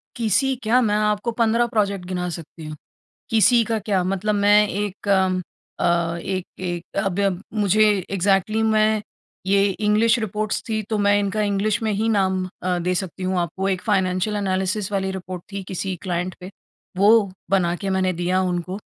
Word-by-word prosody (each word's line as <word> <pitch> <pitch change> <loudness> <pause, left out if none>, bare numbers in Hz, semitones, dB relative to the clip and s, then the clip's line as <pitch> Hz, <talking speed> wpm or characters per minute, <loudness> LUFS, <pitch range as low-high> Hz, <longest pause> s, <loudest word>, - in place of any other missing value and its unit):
किसी 235 +3 +1
क्या? 230 +3 +3
मैं 210 -3 +1
आपको 210 +2 0
15 230 +1 +2
प्रोजेक्ट 200 -5 -1
गिना 180 -1 -3
सकती 165 -1 -9
हूँ। 155 - -6 0.6
किसी 230 +2 +5
का 225 -1 -1
क्या? 200 -3 0
मतलब 195 +3 -1
मैं 205 +1 +4
एक 205 +1 -4 0.7
अ, 170 -1 +1
एक-एक 180 -1 -5
अब 195 -2 -1
अब 195 -2 0 0.2
मुझे 210 +2 +4 0.3
एक्जेक्टली 195 +3 +1
मैं 215 -1 +2 0.4
ये 195 +1 +3
इंग्लिश 215 +4 +2
रिपोर्ट्स 215 0 -2
थी 220 -1 -1
तो 215 - 0
मैं 205 0 +3
इनका 205 +1 -1
इंग्लिश 210 +1 0
में 220 - 0
ही 215 +3 0
नाम 190 -3 +1 0.2
अ, 180 -1 0
दे 180 +1 -1
सकती 185 0 -4
हूँ 185 0 0
आपको। 180 +3 -2
एक 185 -2 0
फाइनेंशियल 185 +2 0
एनालिसिस 190 0 -1
वाली 190 -1 -1
रिपोर्ट 185 -1 -6
थी 200 -1 -4
किसी 190 0 -3
क्लाइंट 180 -1 -2
पे, 185 - -8 0.5
वो 205 0 +5 0.2
बना 175 -3 +2
के 195 +1 -4
मैंने 185 -1 +1
दिया 180 +2 0
उनको 180 +1 -2
195 Hz, 170 wpm, -22 LUFS, 185-215 Hz, 0.7 s, किसी